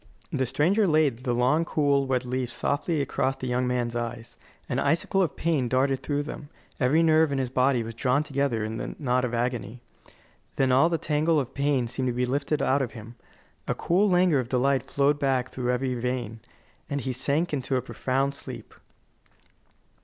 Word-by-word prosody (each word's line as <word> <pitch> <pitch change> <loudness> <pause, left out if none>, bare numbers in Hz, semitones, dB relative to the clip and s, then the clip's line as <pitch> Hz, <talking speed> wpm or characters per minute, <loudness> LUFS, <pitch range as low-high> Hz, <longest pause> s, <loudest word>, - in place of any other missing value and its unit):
The 130 -1 0
stranger 175 - +2
laid 150 -6 +2
the 125 - +1
long, 130 +7 +2
cool, 140 -4 +1
wet 130 -1 0
leaf 125 0 -2
softly 145 +5 -1
across 135 -1 -1
the 130 - -7
young 125 0 0
man's 120 -1 -1
eyes. 120 0 -5 0.3
An - - -1
icicle 170 +4 +1
of 170 -6 0
pain 155 -7 0
darted 130 +2 +1
through 145 0 -1
them; 145 -1 -8 0.3
every 145 +5 +3
nerve 160 -1 +4
in 140 - 0
his 130 -2 -2
body 130 -2 +2
was 115 0 -7
drawn 125 +5 +1
together 140 -5 -1
there - - -1
in 110 +1 -4
a - - -5
knot 125 -3 0
of 120 -1 -1
agony. 120 -1 -2 0.8
Then 135 -1 +2
all 135 +6 +5
the 165 - 0
tangle 155 +1 +1
of 135 -1 -4
pain 140 -3 +1
seemed 130 +2 -3
to 125 - 0
be 125 +1 0
lifted 140 +4 -1
out 135 +2 +2
of 125 - -3
him. 115 0 -10 0.5
A - - 0
cool 195 +5 +2
languor 180 -5 +4
of 120 -2 -4
delight 130 +1 +1
flowed 145 +1 +2
back 130 -3 0
through 125 -1 -1
every 125 +1 -1
vein, 120 -2 -3 0.5
and 140 -1 -2
he 130 0 -3
sank 140 +7 0
into 135 -1 -1
a 125 - +1
profound 135 +1 -1
sleep. - - -9
135 Hz, 195 wpm, -26 LUFS, 125-145 Hz, 0.8 s, all